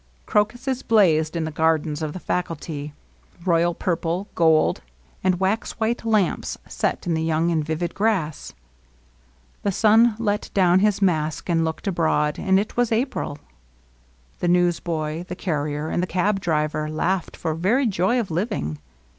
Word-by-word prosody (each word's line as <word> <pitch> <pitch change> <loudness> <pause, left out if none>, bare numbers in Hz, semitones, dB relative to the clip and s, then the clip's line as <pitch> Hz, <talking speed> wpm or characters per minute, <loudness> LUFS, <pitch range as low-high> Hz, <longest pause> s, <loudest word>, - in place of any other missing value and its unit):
Cro 210 - +3
cuses 255 +3 -4
blazed 165 -8 +3
in 165 - -1
the 160 - -3
gardens 160 -1 +1
of 155 -1 -3
the 185 - -6
faculty, 160 -5 -3 0.3
— - - -23
royal 170 -1 +2
LOVELINESS. 170 -2 -1
19 175 +4 -1
purple^ - - -30
gold^ 160 -2 +3 0.4
and 185 -1 +2
wax 195 +4 0
white 230 +1 -1
lamps 215 -5 0
set - - -2
in 175 - 0
the 160 - 0
young 160 +1 +1
and 160 -2 +1
vivid 160 +3 -3
grass. 195 -8 -1 1.1
The 200 - 0
sun 220 +3 +4
let 210 -2 -1
down 185 -2 +5
his 205 0 +2
mask 155 -3 0
and 165 -1 +2
looked 160 +4 -3
abroad^ 160 -5 +1
and 190 0 +3
it 210 - -4
was 245 -1 +1
April. 225 - -1 1.0
The - - -1
newsboy 170 -2 0
the 180 - -6
carrier 150 -4 -2
and - - 0
the 180 - -1
cab 195 +3 +1
driver 155 -3 -1
laughed 175 +4 -1
for 160 -2 -2
very 205 - +1
joy 205 +3 +1
of 210 -7 -3
living. 160 - -2
175 Hz, 165 wpm, -23 LUFS, 160-205 Hz, 1.1 s, down